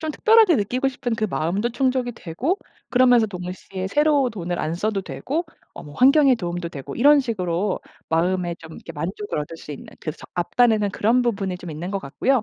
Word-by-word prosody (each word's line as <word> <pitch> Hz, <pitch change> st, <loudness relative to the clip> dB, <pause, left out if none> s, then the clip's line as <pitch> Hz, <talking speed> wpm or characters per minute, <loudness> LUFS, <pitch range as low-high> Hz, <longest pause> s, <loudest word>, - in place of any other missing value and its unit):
좀 315 Hz, 0 st, -2 dB
특별하게 440 Hz, 0 st, +5 dB
느끼고 250 Hz, +6 st, 0 dB
싶은 245 Hz, -3 st, -3 dB
그 220 Hz, -, -1 dB
마음도 185 Hz, +8 st, -1 dB
충족이 255 Hz, 0 st, 0 dB
되고 225 Hz, -, -2 dB, 0.3 s
그러면서 245 Hz, -3 st, +5 dB
동시에 185 Hz, 0 st, -6 dB
새로 290 Hz, +3 st, +3 dB
돈을 175 Hz, -5 st, -4 dB
안 155 Hz, -, -1 dB
써도 195 Hz, +3 st, -1 dB
되고 305 Hz, -, -3 dB, 0.3 s
어 -, -, -9 dB
뭐 150 Hz, -3 st, -11 dB
환경에 275 Hz, -, +6 dB
도움도 175 Hz, -4 st, -4 dB
되고 140 Hz, -5 st, -7 dB
이런 285 Hz, +4 st, +6 dB
식으로 195 Hz, -6 st, -1 dB, 0.3 s
마음에 175 Hz, +1 st, +1 dB
좀 160 Hz, 0 st, -12 dB
이렇게 165 Hz, -, -10 dB
만족을 180 Hz, +5 st, -4 dB
얻을 150 Hz, +2 st, -5 dB
수 150 Hz, -, -8 dB
있는 140 Hz, -, -9 dB
그 155 Hz, -, -3 dB
석 -, -, -14 dB
앞단에는 215 Hz, +4 st, +2 dB
그런 225 Hz, +6 st, +2 dB
부분이 195 Hz, -6 st, -1 dB
좀 175 Hz, -1 st, -8 dB
있는 160 Hz, +4 st, -5 dB
것 200 Hz, -, -1 dB
같고요. 225 Hz, -, 0 dB
205 Hz, 400 characters per minute, -23 LUFS, 175-255 Hz, 0.3 s, 환경에